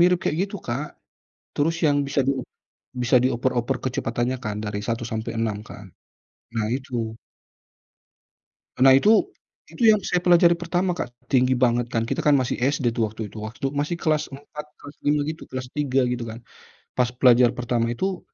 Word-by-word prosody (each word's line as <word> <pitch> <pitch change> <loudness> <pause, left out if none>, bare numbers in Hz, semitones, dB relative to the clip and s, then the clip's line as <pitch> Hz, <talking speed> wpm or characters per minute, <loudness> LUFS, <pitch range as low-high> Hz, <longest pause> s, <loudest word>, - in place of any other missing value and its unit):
Mirip 180 0 +5
kayak - - 0
gitu 205 0 -7
Kak. 135 +6 -2 0.7
Terus 165 +3 +1
yang 145 -1 +4
bisa 140 0 0
di, 135 - +3 0.7
bisa 125 +1 +4
dioper-oper 125 0 0
kecepatannya 120 0 -1
kan 105 -1 -3
dari 105 0 -3
1 115 +1 -1
sampai 110 0 -3
6 110 -3 -1
kan. 105 - -11 0.7
Nah 105 -1 0
itu. 120 -4 -4 1.6
Nah 130 +1 +7
itu 135 +11 +5 0.6
itu - - -7
yang 210 - +2
saya 180 - +1
pelajari 175 -1 +6
pertama 175 +2 -1
Kak. 125 -8 -4 0.2
Tinggi 130 -1 +3
banget 120 -1 +2
kan, 115 -1 +1
kita - - -1
kan 150 - +5
masih 130 - -1
SD 135 -1 +1
tuh 115 - +2
waktu 110 0 -6
itu. - - -14
Waktu 115 +5 -3
masih 145 +4 -1
kelas 155 -3 0
4, 145 +2 -9 0.2
kelas 145 +1 -12
5 145 0 +2
gitu, 160 +1 -5
kelas 130 -1 -5
3 135 -2 +1
gitu 120 -1 -2
kan. 110 +1 -8 0.6
Pas 125 -1 +3
belajar 125 -1 +6
pertama 120 -1 0
itu, 185 +9 -2
130 Hz, 170 wpm, -24 LUFS, 120-150 Hz, 1.6 s, Nah